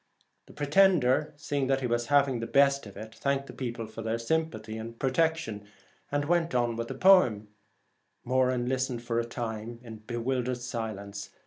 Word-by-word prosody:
The - - -14
pretender, 150 -3 +3
seeing 145 -2 -2
that 135 0 +1
he - - -1
was 120 -1 0
having 140 -3 +3
the 115 - -4
best 140 -1 +3
of 100 - -12
it, 110 +1 -8
thanked 140 +4 -1
the - - -10
people 120 -3 -4
for 110 +1 -9
their 115 +1 -1
sympathy 115 -4 -2
and 115 +1 -7
protection, 135 -7 0 0.4
and 145 0 0
went 170 -2 +1
on 120 -1 +1
with 115 0 -3
the - - -5
poem, 125 - +5 0.8
Moran 130 -1 +2
listening 130 -1 -1
for 115 0 -2
a 120 - -1
time 115 -1 -5
in 115 -2 -9
86 - - -20
bewildered 125 +1 -1
silence. 105 -5 -5
125 Hz, 180 wpm, -29 LUFS, 115-140 Hz, 0.8 s, poem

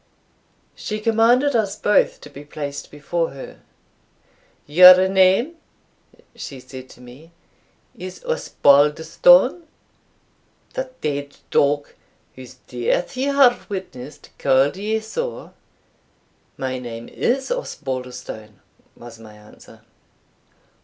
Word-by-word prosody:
She 215 0 -5
commanded 235 +5 +2
us 205 -3 0
both 210 0 +1
to - - -12
be 145 0 -11
placed 145 -1 -7
before 165 +3 -3
her. 135 - -11 1.1
"Your 180 +4 +8
name," 190 - +2 0.8
she 135 - -8
said 130 0 -11
to 125 - -16
me, 130 +7 -15 0.6
"is 185 +1 -9
Osbaldistone? 170 - +3 1.1
the 260 0 -4
dead 145 -1 -4
dog, 145 0 +1 0.4
whose 130 0 -13
death 125 - -2
you 270 +2 -1
have 250 -4 +3
witnessed, 155 -9 -8
called 135 +2 +2
you 215 +3 -2
so." 475 - -6 1.0
"My 130 -1 -4
name 120 -2 -8
is 265 - -2
Osbaldistone," 125 - -6 0.4
was 120 -1 -13
my 110 -1 -14
answer. 105 0 -18
155 Hz, 100 wpm, -21 LUFS, 130-215 Hz, 1.1 s, Your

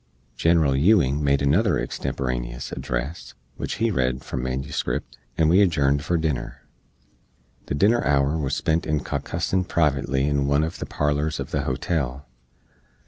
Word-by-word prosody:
General 80 -1 +3
Ewing 75 -3 +3
made 70 0 +2
another 90 +8 +3
extemporaneous - - -3
address, 65 +8 -4 0.2
which - - -3
he 115 0 +1
read 65 -5 0
from 65 - -4
manuscript, 65 -1 -3 0.2
and 80 - +4
we 90 +5 +5
adjourned 70 -6 +2
for 85 +1 +1
dinner. 65 -5 -3 1.0
The - - -2
dinner 110 +10 +3
hour 70 +1 +2
was 70 -2 -1
spent 80 +2 0
in 75 -2 0
caucussin 90 +2 -1
privately 70 -5 +1
in 70 -1 +1
one 70 +2 +3
uv 80 +2 -3
the - - -5
parlors 75 +1 0
uv - - -5
the - - -1
hotel. 70 -1 -2
70 Hz, 145 wpm, -24 LUFS, 65-80 Hz, 1.0 s, we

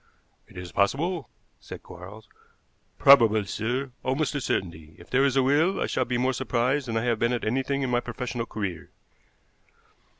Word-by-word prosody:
"It - - -16
is 90 -1 -7
possible," 140 - 0 0.3
said - - -10
Quarles. 100 +5 -12 0.7
"Probable, 115 -6 +6
sir, 125 +7 -3
almost 135 +3 -1
a 145 - -2
certainty. 80 -7 -3
If - - -16
there 135 +2 +3
is 135 -1 +2
a 135 - +4
will 155 +8 +2
I - - 0
shall 130 - -1
be 125 0 -1
more 130 +2 +1
surprised 130 +2 0
than 115 -1 -2
I 115 - 0
have 120 -2 0
been 120 +1 +1
at 120 - -2
anything 135 +4 -1
in 130 - -1
my 120 - +3
professional 120 -1 -5
career." 95 -6 -5
125 Hz, 175 wpm, -26 LUFS, 110-135 Hz, 0.7 s, Probable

